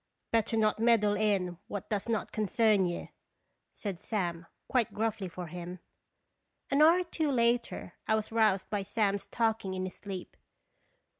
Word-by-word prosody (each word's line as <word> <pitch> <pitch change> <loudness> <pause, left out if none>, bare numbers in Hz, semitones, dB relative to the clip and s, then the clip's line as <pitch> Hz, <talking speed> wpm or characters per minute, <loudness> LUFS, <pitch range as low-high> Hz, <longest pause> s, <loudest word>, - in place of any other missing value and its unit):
' - - -53
' - - -52
Better 225 0 +2
not 215 -1 +2
meddle 225 -3 +4
in 195 -5 0
what 205 - -5
does 210 +2 -1
not 225 -2 -1
con 215 -1 -1
cern 210 -3 +3
you," 175 - -5 0.6
said 195 -5 -5
Sam, 175 -6 -2 0.2
quite 245 -5 +1
gruffly 215 -3 -1
for 180 +1 -6
him. 175 +2 -7 0.9
An 280 +2 +4
hour 330 +4 +7
or - - -1
two 325 -3 -1
later, 235 -6 +1
I 220 - +4
was 220 0 -2
roused 215 -4 +3
by 205 -2 0
Sam's 200 0 0
talking 220 -5 0
in 185 - -2
his 185 - -5
sleep. 190 -3 -7
210 Hz, 170 wpm, -31 LUFS, 190-230 Hz, 0.9 s, hour